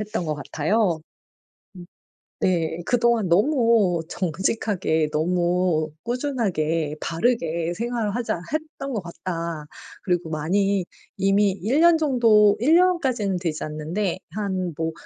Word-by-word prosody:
했던 210 -4 -3
것 155 -1 -1
같아요. 165 +4 0 0.8
음 175 -1 -10 0.6
네. 170 -2 0
'그동안 235 -5 +2
너무 220 - +3
정직하게 180 -2 -1
너무 175 0 +1
꾸준하게 190 - -1
바르게 170 -3 0
생활을 230 -2 -2
하자 235 -8 -2
했던 310 -3 -4
것 210 - -2
같다.' 170 -2 -5 0.4
그리고 175 -3 -1
많이 190 +5 0 0.3
이미 195 +1 +3
1 220 - 0
년 335 -1 +6
정도 230 -8 +4
1 310 +7 +5
년까지는 265 - +2
되지 165 -4 -3
않는데 160 +6 -2 0.2
한 190 -4 -2
뭐 160 0 -2
190 Hz, 225 characters per minute, -23 LUFS, 165-230 Hz, 0.8 s, 년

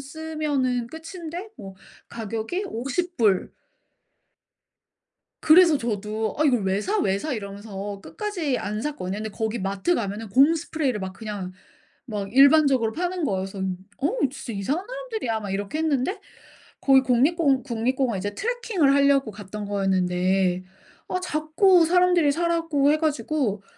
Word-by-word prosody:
쓰면은 280 -5 -2
끝인데 335 - -7
뭐 195 -1 -9 0.3
가격이 230 - -4
$50. 250 - 0 1.9
그래서 330 0 +6
저도 215 -2 -3
"어 310 - +3
이걸 250 -7 +3
왜 190 +1 +1
사? 415 - -1
왜 195 - +1
사?" 310 +8 -4
이러면서 200 -2 -6
끝까지 355 - -3
안 210 +1 -3
샀거든요. 210 -9 -4
근데 220 +1 -4
거기 220 +2 -3
마트 195 - 0
가면은 210 - -3
곰 275 +9 +5
스프레이를 295 -7 -2
막 190 0 -5
그냥 200 -3 -6 0.5
막 205 -4 -5
일반적으로 275 -4 +5
파는 360 +2 -2
거예요. 190 -8 -1
그래서 195 +1 -9 0.4
"어 285 - +1 0.2
진짜 260 -3 -7
이상한 275 - -2
사람들이야." 455 - -4
막 205 -2 -6
이렇게 200 +8 -3
했는데 315 +5 0 0.6
거기 270 -1 +6
국립공 270 +2 +2
국립공원 245 -2 -1
이제 205 +2 -4
트래킹을 445 - +1
하려고 280 -3 +3
갔던 205 0 -8
거였는데 185 -1 +1 0.4
아 365 - -2
자꾸 335 +2 +3
사람들이 355 -3 +4
사라고 330 -3 +1
해 - - +3
가지고 295 -9 -1
260 Hz, 310 characters per minute, -24 LUFS, 205-320 Hz, 1.9 s, 그래서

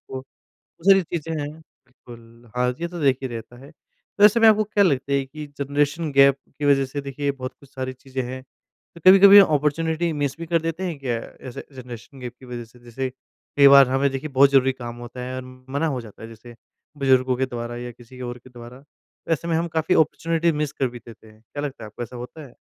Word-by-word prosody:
बहुत 130 0 -7 0.6
सारी 195 -1 +7
चीजें 165 -2 -4
हैं। 145 0 -4 0.4
बिल्कुल, 120 -2 -16
हाँ, 125 0 +1
ये 170 - -2
तो 175 0 -7
देखिए 135 -2 +1
रहता 115 +1 -8
है। 145 - -13 0.5
तो 205 - +6
ऐसे 215 +3 +6
में 225 - +7
आपको 215 0 +4
क्या 205 -1 +2
लगता 140 -4 0
है 140 -1 +1
कि 150 +2 -9
जनरेशन 145 +3 -1
गैप 140 0 +5 0.2
की 150 - -3
वज़ह 140 -1 +4
से 145 +2 -5
देखिए 140 +1 -3
बहुत 130 -1 -6
कुछ 140 - -18
सारी 130 0 -4
चीज़ें 130 +1 -6
हैं? 130 +1 -6 0.5
तो 170 - -13
कभी-कभी 195 +1 +9
अपॉर्च्युनिटी 160 0 +2
मिस 140 -1 -1
भी 165 - -6
कर 165 0 +1
देते 165 +2 -3
हैं 165 -5 -4
क्या 125 -4 -2 0.3
ऐसे 120 - -8
जनरेशन 125 0 -11
गैप 125 -1 -7
की 130 - -14
वज़ह 120 -1 -6
से? 115 +2 -20
जैसे 130 +2 -4 0.5
कई 140 -1 +8
बार 140 -1 +8
हमें 135 +2 +1
देखिए 135 +3 -4
बहुत 135 0 +5
ज़रूरी 135 -1 +4
काम 120 -2 -8
होता 120 +1 -9
है 130 +1 -5
और 130 - -5 0.3
मना 145 +4 0
हो 135 -5 -2
जाता 110 -3 -13
है 110 - -8
जैसे 115 +1 -13 0.4
बुजुर्गों 130 -2 +3
के 130 +1 0
द्वारा 120 -1 -6
या 120 0 -6
किसी 125 +2 -15
और 120 0 -5
के 125 +1 -18
द्वारा, 125 +3 -12 0.5
ऐसे 165 +2 -1
में 165 - +1
हम 170 +1 -1
काफ़ी 160 +2 0
अपॉर्च्युनिटी 165 +1 +1
मिस 150 -1 -2
कर 135 -3 -1
भी 120 0 -10
देते 115 -1 -15
हैं, 110 0 -19
क्या 145 +6 -7
लगता 135 -6 -6
है - - -7
आपको 105 +3 -8
ऐसा 120 +1 -8
होता 130 +5 -9
है? 125 - -18
135 Hz, 230 wpm, -23 LUFS, 125-150 Hz, 0.6 s, कभी-कभी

